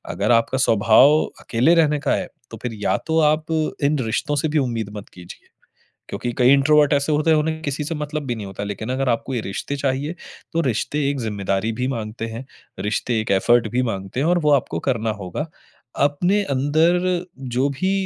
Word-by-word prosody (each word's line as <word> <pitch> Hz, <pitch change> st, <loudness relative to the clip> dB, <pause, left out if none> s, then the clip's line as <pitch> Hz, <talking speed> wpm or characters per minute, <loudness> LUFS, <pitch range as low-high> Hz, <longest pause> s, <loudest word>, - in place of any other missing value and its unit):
अगर 100 Hz, +5 st, +1 dB
आपका 115 Hz, +2 st, +2 dB
स्वभाव 115 Hz, +5 st, +5 dB, 0.2 s
अकेले 130 Hz, +9 st, +2 dB
रहने 150 Hz, -3 st, +3 dB
का -, -, 0 dB
है -, -, -3 dB, 0.2 s
तो 115 Hz, -, -7 dB
फिर 120 Hz, -2 st, -3 dB
या -, -, +2 dB
तो 160 Hz, 0 st, +2 dB
आप 155 Hz, 0 st, +2 dB, 0.4 s
इन 145 Hz, +2 st, +2 dB
रिश्तों 115 Hz, +6 st, -1 dB
से 145 Hz, +2 st, 0 dB
भी 155 Hz, -, 0 dB
उम्मीद 115 Hz, -6 st, -1 dB
मत 100 Hz, -, -9 dB
कीजिए। 90 Hz, -1 st, -13 dB, 0.6 s
क्योंकि 115 Hz, +4 st, -3 dB
कई 125 Hz, +1 st, +6 dB
इंट्रोवर्ट 145 Hz, +1 st, +4 dB
ऐसे 140 Hz, +2 st, +1 dB
होते 150 Hz, +2 st, +2 dB
हैं 160 Hz, -, +5 dB
उन्हें 160 Hz, +1 st, -1 dB
किसी 145 Hz, 0 st, -3 dB
से 165 Hz, -, -3 dB
मतलब 150 Hz, 0 st, -4 dB
भी 120 Hz, -, -1 dB
नहीं 105 Hz, -2 st, -6 dB
होता। 95 Hz, +1 st, -7 dB
लेकिन 105 Hz, +3 st, -5 dB
अगर 130 Hz, +1 st, -1 dB
आपको 120 Hz, +2 st, -1 dB
ये 120 Hz, -, -1 dB
रिश्ते 105 Hz, +8 st, -4 dB
चाहिए 140 Hz, +3 st, -2 dB, 0.4 s
तो 165 Hz, -, +2 dB
रिश्ते 135 Hz, +3 st, -1 dB
एक 140 Hz, -, -3 dB
ज़िम्मेदारी 100 Hz, -1 st, -1 dB
भी 125 Hz, +3 st, -2 dB
माँगते 115 Hz, -3 st, -4 dB
हैं, 115 Hz, +3 st, -7 dB, 0.4 s
रिश्ते 110 Hz, +2 st, -1 dB
एक 110 Hz, -, -5 dB
एफोर्ट 115 Hz, +4 st, +3 dB
भी 125 Hz, +1 st, +1 dB
माँगते 95 Hz, -1 st, -3 dB
हैं 145 Hz, -, +1 dB
और 175 Hz, +1 st, +3 dB
वो 150 Hz, -3 st, +2 dB
आपको 140 Hz, -3 st, +1 dB
करना 115 Hz, -3 st, 0 dB
होगा। 95 Hz, -, -4 dB, 0.6 s
अपने 175 Hz, +8 st, +1 dB
अंदर 155 Hz, +4 st, +2 dB, 0.6 s
जो 135 Hz, +3 st, +2 dB
भी 185 Hz, +8 st, -1 dB
130 Hz, 200 wpm, -21 LUFS, 115-150 Hz, 0.6 s, कई